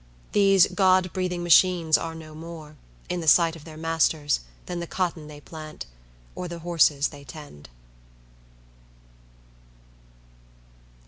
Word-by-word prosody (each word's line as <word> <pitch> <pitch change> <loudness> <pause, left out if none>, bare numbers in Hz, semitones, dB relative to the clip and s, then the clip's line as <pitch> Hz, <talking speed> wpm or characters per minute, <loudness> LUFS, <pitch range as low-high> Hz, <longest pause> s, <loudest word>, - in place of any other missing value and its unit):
These 195 -2 +5
God 185 -2 +2
breathing 180 -2 -2
machines 175 -1 +4
are 165 0 -2
no 155 -1 -11
more, 160 -1 -10 0.3
in 180 -1 -3
the 160 - -6
sight 165 +1 +5
of 155 -2 -13
their 155 -1 -11
masters, 160 -2 +1 0.3
than 175 -1 -5
the 170 - -5
cotton 170 -4 -3
they 150 -1 -11
plant, 155 0 -9 0.5
or 180 - -6
the 170 0 -7
horses 150 -4 +3
they 145 -2 -13
tend. 130 - -12
165 Hz, 125 wpm, -25 LUFS, 155-180 Hz, 0.5 s, These